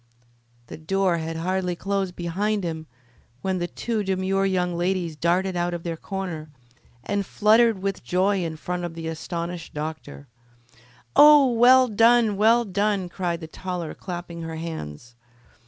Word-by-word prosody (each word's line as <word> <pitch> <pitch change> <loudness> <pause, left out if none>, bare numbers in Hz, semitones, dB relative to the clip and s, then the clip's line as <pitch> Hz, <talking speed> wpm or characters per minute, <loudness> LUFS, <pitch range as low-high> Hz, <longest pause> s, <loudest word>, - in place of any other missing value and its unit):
The - - -9
door 185 +2 0
had 160 0 -4
hardly 180 +1 -1
closed 195 0 -2
behind 200 +4 -1
him 160 -2 -4 0.6
when 190 -1 -1
the 175 - -2
two 225 +3 -3
demure 195 0 0
young 180 -2 0
ladies 175 -2 -1
darted 180 +4 0
out 175 0 -1
of 170 - -7
their 170 -1 -3
corner, 175 -4 -5 0.5
and 200 +5 -1
fluttered 215 0 +3
with 195 -6 -2
joy 185 +6 +1
in 160 -1 -4
front 180 +2 -4
of 170 -1 -5
the 165 -1 -6
astonished 170 +1 -5
doctor. 150 -2 -6 0.9
"Oh, 295 -3 +8
well 250 +2 +6
done! 230 0 +4
well 230 +4 +4
done!" 200 -2 -1
cried 175 -2 -3
the 160 - -7
taller, 175 -1 -5
clapping 175 -2 -7
her 165 0 -5
hands. 120 - -7
180 Hz, 150 wpm, -24 LUFS, 165-200 Hz, 0.9 s, Oh